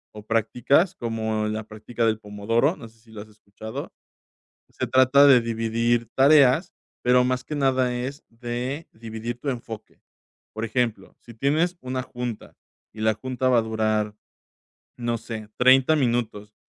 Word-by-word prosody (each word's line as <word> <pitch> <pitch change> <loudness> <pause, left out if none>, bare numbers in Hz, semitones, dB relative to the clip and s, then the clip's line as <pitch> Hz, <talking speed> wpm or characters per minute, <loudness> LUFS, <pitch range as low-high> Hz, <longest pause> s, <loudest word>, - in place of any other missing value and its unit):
o 105 0 -10
prácticas, 125 - +2
como 110 - -2
la 110 +1 -3
práctica 115 +2 -3
del 110 -1 +1
Pomodoro, 110 - 0
no 115 - -10
sé, 115 - -26
¿si 110 -1 -21
la 105 -2 -8
has 110 - -19
escuchado? 110 +1 -9 0.8
Se - - -3
trata 130 +2 +6
de 135 -3 +7
dividir 115 0 0
tareas, 140 +3 +5 0.3
pero 125 0 +4
más 130 0 -1
que 150 - -6
nada, 130 -3 +1
es 135 +4 -5
de 120 +6 -5
dividir 115 +1 -6
tu 140 - -5
enfoque, 115 -3 -8 0.5
por 110 +1 -3
ejemplo, 115 -4 -2
si 120 - -14
tienes 155 +9 +1
una 130 0 -3
junta 120 -3 -7 0.4
y 110 - -10
la 110 0 +3
junta 130 +1 -2
va 125 -2 +4
a - - +3
durar, 110 -1 -1 0.8
no 120 -1 -1
sé, 110 -2 -7
30 130 +4 +5
minutos, 115 -5 -1
120 Hz, 155 wpm, -24 LUFS, 110-130 Hz, 0.8 s, de